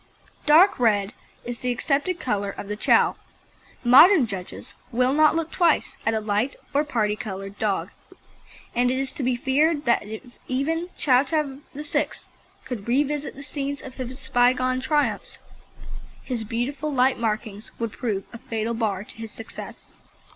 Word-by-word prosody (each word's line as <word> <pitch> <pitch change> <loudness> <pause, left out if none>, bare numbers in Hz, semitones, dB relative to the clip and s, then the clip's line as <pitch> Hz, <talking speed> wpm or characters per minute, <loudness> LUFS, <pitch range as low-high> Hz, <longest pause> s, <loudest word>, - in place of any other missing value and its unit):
Dark 325 +5 +6
red 210 -3 +2 0.3
is 240 -1 -5
the 250 - -1
accepted 290 +8 0
colour 205 -4 -1
of 200 - -7
the 210 - -3
Chow. 210 - +3 0.7
Modern 285 +6 +8
judges 195 -4 -7 0.2
will 250 +2 +2
not 310 +1 +5
look 330 0 -2
twice 340 -4 +2
at 225 - +3
a - - +1
light 215 +5 -1 0.2
or 285 +2 +3
parti 220 -8 0
coloured 195 -2 -7
dog, 205 -3 -1 0.8
and 245 +1 +2
it 260 - 0
is 270 0 -1
to - - -6
be 255 -1 +1
feared 290 +4 +1
that 235 - +3
if 220 +3 -8 0.2
even 325 +7 -1
Ch. - - -14
Chow 275 +1 +2 0.2
VIII. 295 +1 -1 0.6
could 245 -6 -6
revisit 290 +3 0
the 280 - -9
scenes 285 0 -4
of 260 - -9
his 255 +1 -7
bygone 255 +1 +3
triumphs, 295 +2 0 0.9
his 235 -4 -3
beautiful 270 +7 -2
light 260 -2 +2
markings 215 -1 -3
would 230 -2 -3
prove 205 -5 -2
a 235 - -8
fatal 225 0 -3
bar 210 -4 -1
to - - -13
his 225 -1 -7
success. 225 - -9
250 Hz, 160 wpm, -24 LUFS, 220-285 Hz, 0.9 s, Modern